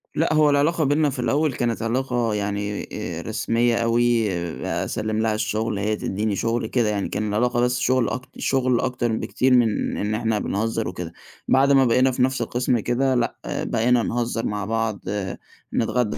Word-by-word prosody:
لأ، 160 0 +1
هو 155 -1 +5
العلاقة 150 +3 +2
بيننا 145 +1 +2
في 130 - -6
الأول 145 +3 +1
كانت 120 -2 -1
علاقة 120 -1 0
يعني 100 0 -3
آآ - - -4
رسمية 115 +1 0
أوي، 115 -2 +2 0.3
أسلِّم 110 0 -2
لها 110 -1 +1
الشُغل 110 -1 -1
هي 105 +1 0
تدّيني 105 +1 -2
شُغل 115 +2 -1
كده 120 -3 +1
يعني، 100 -2 -1
كان 105 - -2
العلاقة 120 +3 +1
بس 125 +1 +1
شُغل 130 -2 +2
أك 125 - -3 0.2
شُغل 130 -2 +1
أكتر 125 -2 -1
بكتير 125 +3 +1
من 115 -4 +2
إن 105 +1 -1
إحنا 110 -1 0
بنهزّر 110 -2 -1
وكده. 85 -2 -6 0.3
بعد 135 +1 +4
ما 135 -1 +5
بقينا 130 +3 +3
في 125 - -2
نَفْس 130 -1 0
القِسْم 120 +1 0
كده 130 +4 +1
لأ، 120 -1 0
بقينا 120 +1 +1
نهزّر 115 -1 -2
مع 105 -1 -2
بعض، 110 -1 -1 0.7
نتغدّى 120 -11 0
115 Hz, 170 wpm, -23 LUFS, 110-125 Hz, 0.7 s, هو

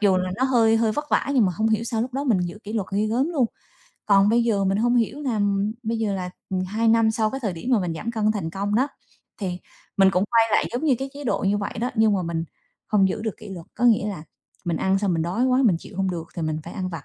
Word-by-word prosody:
dù 200 -3 +4
là 185 0 -1
nó 260 - +1
hơi 230 -4 +4
hơi 225 -1 +2
vất 295 +5 -4
vả - - +2
nhưng 245 - +5
mà 185 - 0
hông 220 +1 +1
hiểu 220 +1 +1
sao 230 -2 -2
lúc 250 +1 -5
đó 275 +2 -2
mình 220 -9 +2
giữ 175 +3 -4
kỷ 210 - -6
luật 215 -5 -1
ghê 210 +2 +1
gớm 250 +8 +1
luôn. 280 -8 +1 0.6
Còn 200 -1 +5
bây 235 +1 +3
giờ 205 -4 +1
mình 195 +1 +1
hông 240 +2 +2
hiểu 240 +5 0
làm 205 -5 0
bây 225 0 -2
giờ 215 -3 0
là, 180 -1 -4 0.2
ừm, 185 -1 -1
2 220 +5 0
năm 225 0 +4
sau 220 -1 0
cái 270 +3 -5
thời 210 -6 -2
điểm 175 +9 -5
mà 230 - +4
mình 175 -3 -2
giảm 215 +8 -4
cân 215 -1 +1
thành 195 -7 -3
công 200 +3 -2
đó, 260 +6 +2 0.5
thì 180 -2 -3 0.4
mình 195 -1 +6
cũng 185 0 +1
quay 230 -1 +5
lại - - +3
giống 245 +6 -2
như 280 - +4
cái 270 0 -4
chế 290 0 -8
độ 245 - +1
như 205 +1 +2
vậy 200 - -3
đó, 245 +2 -1
nhưng 220 -1 +4
mà 190 - 0
mình 165 -1 -2 0.4
không 195 -3 +4
giữ 210 - -3
được 220 -3 -3
kỷ - - -11
luật, 180 -4 -8
có 245 - -2
nghĩa 220 -3 +4
là 190 -7 -5 0.4
mình 170 -2 -1
ăn 190 +3 +1
xong 195 -2 0
mình 165 - 0
đói 180 +9 0
quá 260 +1 +3
mình 195 -8 +4
chịu 185 - -12
hông 190 -1 0
được 165 -2 -5
thì 170 - -2
mình 155 -1 -1
phải 170 - -8
ăn 185 -3 -3
vặt. 165 -3 -7
210 Hz, 295 wpm, -24 LUFS, 190-230 Hz, 0.6 s, mình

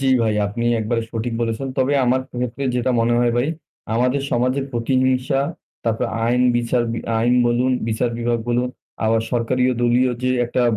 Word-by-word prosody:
জ্বি, 135 - +1
ভাই 110 -2 +1
আপনি 115 +4 -3 0.2
একবারে 115 +2 -1
সঠিক 115 +1 -3
বলেছেন। 115 +3 -2
তবে 130 +2 +2
আমার 125 +1 +2 0.2
ক্ষেত্রে 125 +2 -3
যেটা 125 +1 +1
মনে 120 +1 +2
হয় 120 -1 +2
ভাই 125 +5 +1 0.5
আমাদের 125 +4 +1
সমাজের 130 +3 +1
প্রতিহিংসা 130 +2 +1 0.4
তারপর 115 -1 0 0.2
আইন, 125 +2 +2
বিচার 120 0 +1 0.4
আইন 120 +2 +3
বলুন, 120 +2 +2 0.2
বিচার 115 +2 0
বিভাগ 120 0 0
বলুন 120 +1 +1 0.4
আবার 110 0 +3
সরকারি 125 +1 +1 0.2
দলীয় 125 +2 +3
যে 130 - +1 0.2
একটা 125 +1 0
120 Hz, 160 wpm, -21 LUFS, 115-130 Hz, 0.5 s, আইন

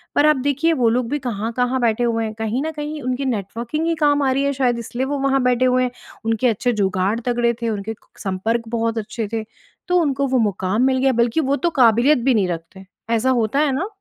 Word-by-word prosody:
पर 290 - +4
आप 305 0 +5
देखिए 285 +4 +2
वो 245 -6 +2
लोग 240 0 0
भी 295 - 0
कहाँ-कहाँ 245 +1 -1
बैठे 235 0 +1
हुए 230 -1 0
हैं 215 - -4
कहीं 220 +3 -2
न 320 - -2
कहीं 300 -1 -5
उनकी 255 +2 -2
नेटवर्किंग 235 - -3
ही 335 - +1
काम 290 -2 +2
आ 265 - +2
रही 275 +1 +1
है 280 0 +1
शायद 250 -3 0
इसलिए 240 +3 -3
वो 285 +1 -2
वहाँ 270 0 +2
बैठे 250 0 +2
हुए 255 0 +3
हैं। 250 - -1 0.3
उनके 225 +2 +1
अच्छे 245 +2 +1
जुगाड़ 195 +1 0
तगड़े 240 -1 +1
थे। 230 - 0
उनके 215 0 -3
क - - -24
संपर्क 215 +5 -1
बहुत 230 0 -1
अच्छे 220 0 -4
थे 225 -1 -1 0.4
तो 360 - +3
उनको 280 -2 0
वो 260 -1 +1
मुक़ाम 205 0 0
मिल 260 0 +3
गया 265 +1 +3
बल्कि 235 +5 +1
वो 275 -1 +1
तो 345 +4 0
क़ाबिलियत 240 +5 +5
भी 265 - +3
नहीं 205 -5 +2
रखते 175 +3 -7 0.3
ऐसा 245 +4 +1
होता 240 +2 +1
है 300 -2 +2
ना? 310 +10 -1
245 Hz, 235 wpm, -20 LUFS, 225-270 Hz, 0.4 s, आप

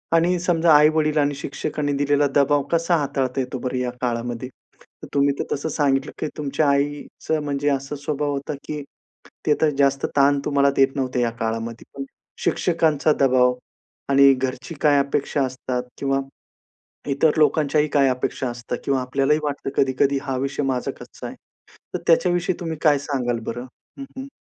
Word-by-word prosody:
आणि 175 +2 +3
समजा 170 -2 +3
आई-वडील 155 +1 +4
आणि 145 -1 +2
शिक्षकांनी 145 +1 -3
दिलेला 145 0 +3
दबाव 145 0 +4
कसा 170 +1 +2
हाताळता 135 -3 -1
येतो 130 +1 -4
बरं 125 +1 -3
या 125 -1 -1
काळामध्ये? 120 0 -3 0.5
तर - - -7
तुम्ही 140 0 +3
तर - - +1
तसं 145 +3 -3
सांगितलं, 140 -3 0
की 155 - -1
तुमच्या 145 0 0
आईचं 145 +2 -1
म्हणजे 145 0 -1
असा 135 +1 -2
स्वभाव 145 -1 -1
होता, 140 +1 -3
की 150 - -5
एक 145 - -8 0.6
ते 150 - +4
तर, 155 - +4
जास्त 140 -1 +2
ताण 140 +1 +4
तुम्हाला 140 -1 +3
देत 135 0 +3
नव्हते 130 -2 -1
या 120 - +2
काळामध्ये. 115 +1 -3
पण 135 - -4 0.4
शिक्षकांचा 160 -3 +2
दबाव 125 -2 +4 0.6
आणि 140 0 +7
घरची 130 +5 -4
काय 145 -2 +5
अपेक्षा 140 0 0
असतात? 125 -1 -3
किंवा 135 -1 0 0.9
इतर 140 +3 +3
लोकांच्याही 150 -1 +3
काय 140 -1 +3
अपेक्षा 125 0 -2
असता? 120 0 -5
किंवा 135 -2 +1
आपल्यालाही 135 +4 +1
वाटतं 145 -2 -3
कधी-कधी 135 +1 +2
हा 135 - -2
विषय 140 +2 -2
माझा 130 -2 -1
कच्चाय, - - -9 0.6
तर - - -2
त्याच्याविषयी 175 +1 +3
तुम्ही 165 -2 -4
काय 150 -3 +4
सांगाल 125 -4 -2
बरं? 120 +2 -5 0.3
हं, 275 - -5
हं. 265 - -6
140 Hz, 160 wpm, -22 LUFS, 130-150 Hz, 0.9 s, आणि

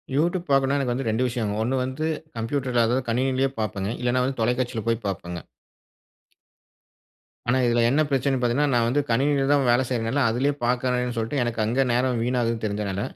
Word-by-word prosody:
YouTube 175 +4 +1
பார்க்கணும்னா, 135 0 +3
எனக்கு 125 -3 0
வந்து 130 +1 -3
2 110 +3 +1
விஷயம்ங்க. 115 -4 -2
1 125 +4 0
வந்து 130 +4 -3 0.3
கம்ப்யூட்டர்ல 120 0 0
அதாவது 125 +2 0
கணினியிலேயே 130 +3 +1
பார்ப்பேன்ங்க. 105 -1 -2
இல்லைனா 125 +1 +1
வந்து 130 -1 -3
தொலைக்காட்சியில 120 -1 0
போய் 115 0 0
பார்ப்பேங்க. 90 -2 -4 2.1
ஆனா, 120 +2 +3
இதில 120 0 +2
என்ன 140 +5 +3
பிரச்சனைன்னு 135 -1 +1
பார்த்தீங்கன்னா, 130 +4 +1
நான் 120 -1 +3
வந்து 140 +5 +2
கணினியில 135 +4 +2
தான் 140 -3 +3
வேல 120 +2 +4
செய்றதுனால 125 +3 0
அதிலேயே 130 +6 +1
பார்க்கறேன்னு 125 0 0
சொல்லிட்டு, 115 +5 -1
எனக்கு 120 -1 -3
அங்கே 125 +5 +2
நேரம் 125 0 +1
வீணாகுதுன்னு 115 -2 -1
தெரிஞ்சனால, 100 -2 -2
125 Hz, 165 wpm, -24 LUFS, 115-135 Hz, 2.1 s, வேல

